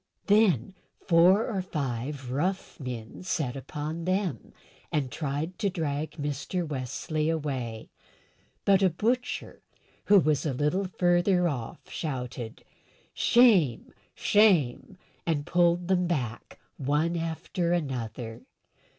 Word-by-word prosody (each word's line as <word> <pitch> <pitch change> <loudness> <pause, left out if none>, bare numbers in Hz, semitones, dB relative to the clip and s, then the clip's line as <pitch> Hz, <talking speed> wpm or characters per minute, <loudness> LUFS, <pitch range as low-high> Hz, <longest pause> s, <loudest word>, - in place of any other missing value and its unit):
Then 200 - +3 0.3
four 180 +5 +5
or 200 -6 -1
five 135 -5 -4
rough 180 +9 -2
men 120 -5 -6
set 155 -8 -2
upon 150 +4 -5
them, 185 - -1 0.4
and 135 -4 -1
tried 155 +4 -3
to 200 - +1
drag 155 -4 -3
Mr. 145 +4 -3
Wesley 150 +3 -2
away; 130 -8 -3 0.7
but 195 -1 +5
a 190 - +5
butcher, 240 +9 -2 0.4
who 205 - +6
was 155 -5 +1
a 150 - -1
little 150 +9 +1
further 180 0 +2
off, 125 -8 -5
shouted, 125 -6 -5 0.5
"Shame! 200 - +4 0.2
shame!" 190 - +3 0.3
and 150 -3 0
pulled 175 0 +2
them 180 -1 +2
back 125 -9 -3 0.2
one 150 +5 +1
after 170 +1 -2
another. 120 -8 -3
160 Hz, 110 wpm, -28 LUFS, 135-180 Hz, 0.7 s, who